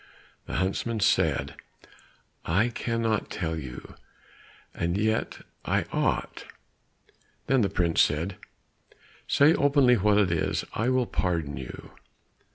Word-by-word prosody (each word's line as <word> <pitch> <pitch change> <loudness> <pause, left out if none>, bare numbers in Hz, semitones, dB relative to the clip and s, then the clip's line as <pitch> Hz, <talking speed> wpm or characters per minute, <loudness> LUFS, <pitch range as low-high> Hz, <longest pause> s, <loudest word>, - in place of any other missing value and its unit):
The - - -6
huntsman 105 +5 -1
said, - - +1 0.9
"I 100 +9 +2
cannot 115 -2 -1
tell 80 -2 -3
you, 65 -6 -8 0.8
and 85 +2 -1
yet 110 +2 -1 0.2
I - - 0
ought." - - -1 1.0
Then 135 -1 +2
the 100 - +1
prince 85 -4 +2
said, 85 +6 0 0.9
"Say 145 +3 +5
openly 140 -5 +4
what 105 +1 +3
it 100 -4 +3
is, 85 - -1
I 115 +4 0
will 130 -1 +2
pardon 85 - -2
you." 65 -1 -9
100 Hz, 115 wpm, -27 LUFS, 85-115 Hz, 1.0 s, Say